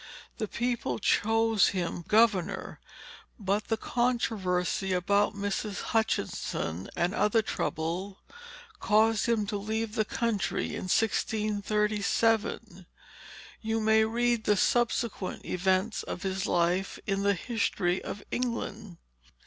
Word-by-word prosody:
The 215 - -1
people 240 +2 -2
chose 225 0 +3
him 175 -2 -2
governor; 215 -4 +2 0.6
but 205 0 -1
the 225 - 0
controversy 200 -7 0
about 200 +4 +2
Mrs. 205 0 -3
Hutchinson, 95 - -1
and 175 +2 0
other 210 +2 +2
troubles, 180 +3 -3 0.6
caused 220 +1 +3
him 225 -3 +2
to 205 0 -2
leave 220 +2 -3
the 220 -2 +1
country 225 -1 -1
in - - -5
1637. 210 -1 0 0.7
You 225 0 -1
may 220 0 +4
read 235 0 +1
the 210 - +3
subsequent 235 -3 0
events 190 +4 0
of 180 - -6
his 190 -1 -2
life 175 +2 +1
in 195 -1 0
the 200 0 +2
History 185 -3 -1
of 205 - -6
England." 225 -6 -3
210 Hz, 110 wpm, -29 LUFS, 190-225 Hz, 0.7 s, may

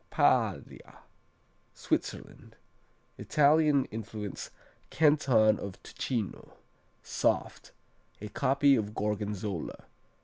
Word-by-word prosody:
Paglia - - 0 0.7
Switzerland - - -4 0.6
Italian 150 -2 +3
influenced 110 -2 -6 0.4
Canton 135 -7 +3
of 100 -2 -7
Ticino. 115 -7 -4 0.5
Soft. - - -1 0.5
A 105 - -6
copy 140 +4 +3
of 105 -2 -3
Gorgonzola. 105 -3 -3
110 Hz, 70 wpm, -29 LUFS, 105-140 Hz, 0.7 s, Italian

